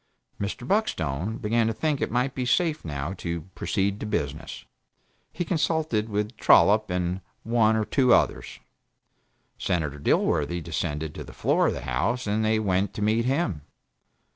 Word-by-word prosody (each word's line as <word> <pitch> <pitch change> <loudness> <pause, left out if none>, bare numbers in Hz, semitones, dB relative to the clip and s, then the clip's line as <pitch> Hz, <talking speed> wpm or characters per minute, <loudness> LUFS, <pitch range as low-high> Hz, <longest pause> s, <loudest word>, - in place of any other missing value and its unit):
Mr. 100 +5 -4
Buckstone 105 - 0
began 115 +1 +1
to 115 - 0
think 150 +3 -1
it - - 0
might 125 +3 0
be 130 - -2
safe, 155 +5 +1
now, 75 +2 -4
to 85 -1 -3
"proceed 100 0 -1
to - - -4
business." 75 -7 -4 0.7
He 175 - -3
consulted 155 - 0
with 105 +3 -2
Trollop 105 +1 +5
and 90 +1 -1 0.2
one 110 -1 +3
or 110 -1 +1
two 130 0 +2
others. - - +2 1.0
Senator 80 -6 -1
Dilworthy 75 +3 +1
descended 75 -1 -3
to - - -7
the - - -12
floor - - +2
of - - +1
the - - -5
House 70 - -1
and 105 +1 0
they 110 0 +2
went 95 -2 0
to 105 - -2
meet 110 +2 +2
him. 125 - 0
105 Hz, 160 wpm, -26 LUFS, 85-120 Hz, 1.0 s, Trollop